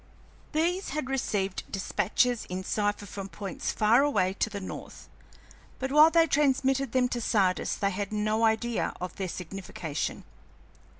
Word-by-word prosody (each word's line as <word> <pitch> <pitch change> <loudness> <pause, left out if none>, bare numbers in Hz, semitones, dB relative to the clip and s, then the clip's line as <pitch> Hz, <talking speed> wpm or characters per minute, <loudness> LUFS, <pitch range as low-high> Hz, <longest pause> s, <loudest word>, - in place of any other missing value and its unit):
These 350 +5 0
had 270 -3 -2
received 200 -7 -1
despatches 230 +4 0
in 185 +1 -5
cipher 205 +1 -1
from 195 0 -7
points 200 -1 -4
far 220 +4 +4
away 190 -10 +2
to - - +1
the 205 -1 -5
north, 185 - -8 0.7
but 265 +1 -3
while 305 +2 +8
they 330 0 +5
transmitted 275 -3 +2
them 255 -1 +3
to 240 -1 -2
Sardis 195 -5 +1
they 200 0 0
had 200 +1 -3
no 215 +1 0
idea 225 +1 +1
of 180 0 -5
their 190 -2 -3
signification. 180 -4 -5
215 Hz, 145 wpm, -28 LUFS, 195-265 Hz, 0.7 s, while